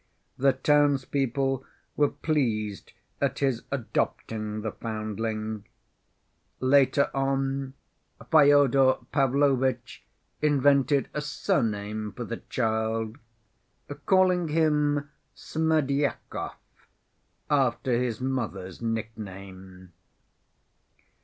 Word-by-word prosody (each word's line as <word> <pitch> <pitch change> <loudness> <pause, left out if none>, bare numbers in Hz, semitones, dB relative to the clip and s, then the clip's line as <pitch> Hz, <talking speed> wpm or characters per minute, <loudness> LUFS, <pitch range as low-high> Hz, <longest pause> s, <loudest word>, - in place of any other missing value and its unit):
The 135 +1 +3
townspeople 135 -1 +1 0.3
were 145 -1 +3
pleased 115 - -2 0.3
at - - 0
his 135 -4 0
adopting 110 -4 -2
the 110 0 -3
foundling. 110 0 -4 0.9
Later 135 +1 +3
on, 135 0 -1 0.6
Fyodor 140 -3 +6 0.2
Pavlovitch 135 -3 +1 0.4
invented 140 -1 +3
a 150 - -2
surname 105 -7 -1
for 120 - -5
the 115 0 -5
child, 110 0 -2 0.9
calling 185 -2 +4
him 150 -2 +1 0.2
Smerdyakov, 150 -3 -1 1.0
after 135 -2 +1
his 120 -3 -2
mother's 115 -8 -3
nickname. 95 -5 -6
130 Hz, 75 wpm, -27 LUFS, 110-145 Hz, 1.0 s, Fyodor